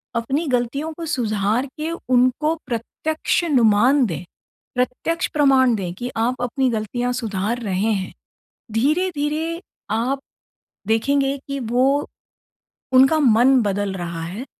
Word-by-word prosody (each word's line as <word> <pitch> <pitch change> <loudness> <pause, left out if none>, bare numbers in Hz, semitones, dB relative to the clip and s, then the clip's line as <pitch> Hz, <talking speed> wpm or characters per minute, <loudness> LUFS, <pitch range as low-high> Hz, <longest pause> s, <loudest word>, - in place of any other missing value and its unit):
अपनी 270 +7 -1
गलतियों 255 +5 -1
को 330 +1 -7
सुधार 220 -4 0
के 315 +2 -2 0.2
उनको 255 +6 +3
प्रत्यक्ष 305 +8 -1
नुमान 250 -1 +4
दें, 170 -4 -4 0.5
प्रत्यक्ष 250 +7 -1
प्रमाण 270 -4 +4
दें 180 -4 -4
कि 245 +6 -6
आप 245 +2 0
अपनी 255 +2 0
गलतियाँ 240 +3 -2
सुधार 225 -1 -2
रहे 200 +1 0
हैं। 190 -3 -2 0.6
धीरे-धीरे 310 - 0 0.3
आप 245 +5 0 0.7
देखेंगे 275 +5 +2
कि 275 -1 -3
वो 255 +5 +1 0.9
उनका 270 +5 +6
मन 255 0 +5
बदल 200 -1 -1
रहा 170 -3 -5
है 200 +10 -6
250 Hz, 120 wpm, -21 LUFS, 220-280 Hz, 0.9 s, उनका